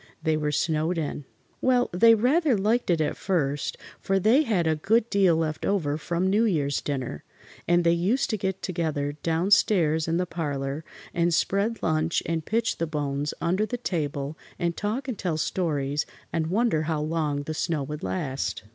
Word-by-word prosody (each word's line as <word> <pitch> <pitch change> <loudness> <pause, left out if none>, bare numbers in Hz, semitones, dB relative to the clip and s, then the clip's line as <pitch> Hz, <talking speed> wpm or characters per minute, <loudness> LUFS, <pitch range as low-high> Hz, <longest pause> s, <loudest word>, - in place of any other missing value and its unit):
They 160 -1 +2
were 150 -1 -1
snowed 160 +3 0
in! 145 -2 -3 0.4
Well, 250 -1 +3
they 225 +6 +6
rather 260 +3 +3
liked 215 +4 +1
it 170 -2 +3
at 155 - 0
first, 145 -7 -1 0.2
for 195 - 0
they 225 +9 +5
had 210 - +1
a 160 -1 +2
good 220 +9 +2
deal 195 -5 +4
left 160 -1 -2
over 160 -8 0
from 170 +4 -1
New 205 +4 +3
Year's 150 -10 +1
dinner, 130 - -4 0.4
and 175 0 +4
they 170 - +4
used 190 +12 +1
to 215 - 0
get 190 -1 -3
together 155 -5 -1
down 165 +4 0
stairs 165 -6 +3
in 165 +1 +1
the 180 - 0
parlor 145 -3 -3 0.3
and 170 0 +2
spread 200 +7 0
lunch 160 0 +1
and 165 -1 -1
pitch 225 +6 -1
the 165 - 0
bones 145 -1 -2
under 180 +5 +1
the 245 - -3
table 150 - -3 0.2
and 170 -1 -1
talk 225 +6 -2
and 250 -5 -4
tell 175 -5 -1
stories 150 -4 -1 0.3
and 160 -1 0
wonder 205 -3 +1
how 155 -2 0
long 150 -2 -1
the 155 - -4
snow 155 -2 -1
would 150 +3 -6
last. 140 -9 -3
165 Hz, 180 wpm, -26 LUFS, 150-200 Hz, 0.4 s, they